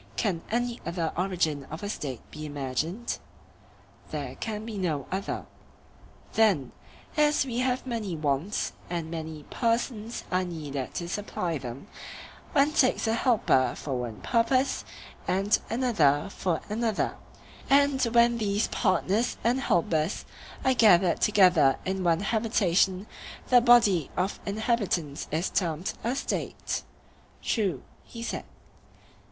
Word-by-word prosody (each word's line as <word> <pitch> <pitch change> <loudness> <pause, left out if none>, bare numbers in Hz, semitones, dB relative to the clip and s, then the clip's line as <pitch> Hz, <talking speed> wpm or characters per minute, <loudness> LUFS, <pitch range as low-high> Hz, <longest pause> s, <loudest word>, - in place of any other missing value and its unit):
Can 190 -8 0
any 240 +1 -1
other 170 -2 -2
origin 170 -6 0
of 160 +6 -7
a - - -2
State 135 - -4
be 155 - -8
imagined? 145 - -3 0.9
There - - -4
can 215 -1 -5
be 225 -2 -6
no 155 -7 -1
other. 195 +2 -3 0.9
Then, 190 - +3 0.4
as 295 -2 +3
we 245 -2 -2
have 255 0 0
many 225 -8 -3
wants, 150 +5 -1 0.2
and 170 -2 -3
many 160 -2 -5
persons 230 -1 -1
are 185 0 +2
needed 150 -7 -5
to 170 - -3
supply 175 -4 -2
them, 125 +1 -7 0.7
one 290 0 +4
takes 255 -3 +3
a 225 - +2
helper 225 - +2
for 140 - -4
one 120 -5 -4
purpose 255 - +2 0.4
and 195 +3 +2
another 200 - +2
for 175 -5 -1
another; 220 0 -1 0.5
and 280 -1 +4
when 235 0 +4
these 205 0 +1
partners 200 +3 +1
and 240 +3 +2
helpers 170 - +1 0.4
are 260 - +5
gathered 190 -7 +5
together 180 -9 +5
in 190 0 -1
one 170 0 +2
habitation 200 -3 +2 0.4
the 245 -1 +7
body 225 - +5
of 185 +2 -1
inhabitants 200 - -1
is 160 +5 -1
termed 170 -1 -1
a 240 +3 0
State. - - -3 0.6
True, 190 - 0 0.2
he 230 -1 -9
said. - - -4
195 Hz, 125 wpm, -28 LUFS, 160-230 Hz, 0.9 s, the